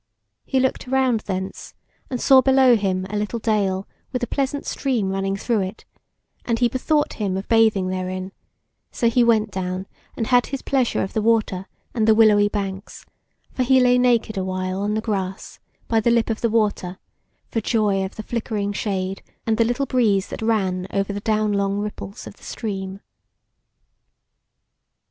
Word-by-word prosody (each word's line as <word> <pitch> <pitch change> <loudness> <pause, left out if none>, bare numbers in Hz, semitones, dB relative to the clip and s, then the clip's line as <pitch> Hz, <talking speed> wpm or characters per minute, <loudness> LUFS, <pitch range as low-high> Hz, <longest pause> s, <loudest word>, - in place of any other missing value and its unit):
He 265 - +1
looked 260 0 0
around 260 -3 +2
thence 190 -2 -5 0.3
and 250 - -3
saw 265 +1 +6
below 265 -1 +5
him 190 -3 -1
a - - -3
little 210 +3 -2
dale 200 -4 0 0.2
with 250 -1 -2
a - - +3
pleasant 275 +3 -2
stream 235 -9 -1
running 195 0 -1
through 230 +2 0
it, 190 +3 -5 0.6
and 230 -1 0
he 240 +1 +3
bethought 295 +5 0
him 190 -2 0
of 195 - -5
bathing 220 -5 +3
therein, 185 0 -4 0.6
so 235 - 0
he 245 +1 +4
went 220 -2 +3
down 185 0 -3 0.3
and 225 - -1
had 245 +1 +3
his 275 -1 -5
pleasure 260 -4 +1
of 195 - -5
the 220 - 0
water 210 -4 +1 0.3
and 225 -3 +1
the 220 - +6
willowy 210 -2 +5
banks; 195 -1 -5 0.5
for - - -2
he 260 +1 +4
lay 250 0 +4
naked 235 -4 +2
a - - -1
while 185 0 -2
on 210 +1 0
the 220 - 0
grass 195 -4 -4 0.3
by 225 - +2
the 220 - +2
lip 235 -1 +2
of 220 - -4
the 230 - +2
water, 205 -5 0 0.5
for 225 - -1
joy 205 -3 +1
of 190 - -6
the 215 - -6
flickering 215 -4 -2
shade, 195 -2 -2 0.2
and 225 0 0
the - - +6
little 245 +4 0
breeze 220 -7 +1
that - - -6
ran 190 -5 0
over 195 0 -1
the 205 - -3
down 215 0 +1
long 200 0 0
ripples 205 -1 -6
of - - -11
the - - -21
stream. 195 -3 -5
215 Hz, 180 wpm, -22 LUFS, 195-235 Hz, 0.6 s, saw